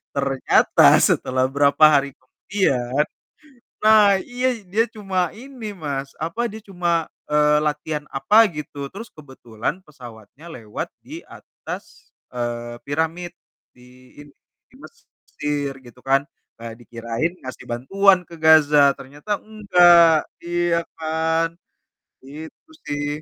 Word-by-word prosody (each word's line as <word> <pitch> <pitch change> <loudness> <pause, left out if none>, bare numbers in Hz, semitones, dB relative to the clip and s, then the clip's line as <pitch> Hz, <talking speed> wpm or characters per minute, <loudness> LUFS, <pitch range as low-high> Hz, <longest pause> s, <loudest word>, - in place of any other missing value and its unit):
Ternyata 135 -1 +4
setelah 130 0 +1
berapa 140 +2 +2
hari 140 0 +1
kemudian 135 -2 -2 0.8
Nah, 215 -2 +6
iya 245 +2 -2
dia 215 +6 0
cuma 195 -5 -2
ini, 240 -4 -9
Mas, 140 -5 -5
apa? 170 +10 -3
Dia 220 -1 -10
cuma, 175 -4 -1 0.2
eee, 150 0 +3
latihan 150 0 -3
apa 215 +11 +5
gitu. 150 -4 -7
Terus 215 +8 -11
kebetulan 135 - -7
pesawatnya 125 - -14
lewat 115 -10 -7 0.2
di - - -9
atas, - - -11 0.2
eee, 120 -1 -5
piramid 160 +4 -3 0.4
di 125 +1 -20
ini, 145 - -18 0.4
di - - -21
Mesir, 145 - -7
gitu 120 0 -16
kan. 135 +2 +1 0.4
Eee, 115 0 -8
dikirain 115 - -4
ngasih 130 0 -9
bantuan 185 +10 +2
ke 170 -1 -14
Gaza, 150 -3 +5
ternyata 145 +10 -5
enggak. 175 -6 +4
Iya 175 -1 -1
kan? 160 +1 -1 0.7
Itu 160 - -12 0.2
sih. 145 +1 -3
155 Hz, 115 wpm, -21 LUFS, 135-180 Hz, 0.8 s, Nah